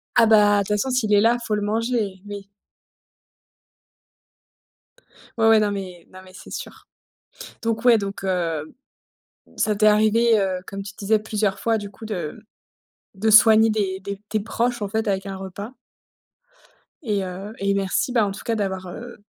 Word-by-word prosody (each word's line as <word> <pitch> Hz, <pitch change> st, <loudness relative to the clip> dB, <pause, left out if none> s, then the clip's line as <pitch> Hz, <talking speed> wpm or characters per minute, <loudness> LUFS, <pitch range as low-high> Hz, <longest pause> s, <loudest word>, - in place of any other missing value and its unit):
Ah 230 Hz, -, +6 dB
bah, 205 Hz, -2 st, +5 dB
toute 195 Hz, -, -2 dB
façon, 235 Hz, +6 st, -1 dB
s'il 235 Hz, -5 st, +1 dB
est 205 Hz, -, +5 dB
là, 235 Hz, +2 st, +4 dB
il -, -, -9 dB
faut 210 Hz, -, 0 dB
le 210 Hz, -, -2 dB
manger, 215 Hz, -2 st, -1 dB
oui. 200 Hz, -1 st, -8 dB, 2.9 s
Ouais, 225 Hz, 0 st, +3 dB
ouais, 220 Hz, -1 st, +6 dB
non, 210 Hz, -1 st, +1 dB
mais 185 Hz, -4 st, -7 dB
non, 185 Hz, -, -12 dB
mais 185 Hz, -, -15 dB
c'est -, -, -13 dB
sûr, -, -, -8 dB, 0.8 s
donc 225 Hz, +1 st, -2 dB
ouais 235 Hz, -3 st, +6 dB
donc 195 Hz, -1 st, -5 dB
heu, 165 Hz, -5 st, -2 dB, 0.8 s
ça 210 Hz, -1 st, +1 dB
t'est 215 Hz, +1 st, +3 dB
arrivé, 220 Hz, +2 st, +4 dB
heu, 190 Hz, -2 st, -1 dB
comme 195 Hz, 0 st, -6 dB
tu 200 Hz, 0 st, -9 dB
disais 210 Hz, +2 st, +1 dB
plusieurs 210 Hz, -2 st, -2 dB
fois, 225 Hz, -1 st, +1 dB
du 205 Hz, -1 st, -7 dB
coup, 215 Hz, +3 st, -12 dB
de 200 Hz, 0 st, -5 dB, 0.7 s
de 220 Hz, +3 st, 0 dB
soigner 220 Hz, +1 st, +7 dB
des 195 Hz, -3 st, -1 dB
des 200 Hz, +1 st, -6 dB
tes 215 Hz, -1 st, -1 dB
proches, 235 Hz, +2 st, -2 dB
en 200 Hz, -, -2 dB
fait, 220 Hz, +2 st, -2 dB
avec 195 Hz, 0 st, -1 dB
un 195 Hz, -1 st, -5 dB
repas? 200 Hz, +5 st, -8 dB, 1.3 s
Et 205 Hz, -4 st, -1 dB
heu, 190 Hz, +4 st, -7 dB
et 200 Hz, 0 st, +1 dB
merci, 200 Hz, +7 st, 0 dB
bah, 230 Hz, -4 st, +3 dB
en 200 Hz, -, -2 dB
tout 195 Hz, -, -8 dB
cas, 230 Hz, -, -1 dB
d'avoir, 190 Hz, -3 st, -3 dB
heu, 240 Hz, +7 st, -9 dB
205 Hz, 175 wpm, -22 LUFS, 195-220 Hz, 2.9 s, soigner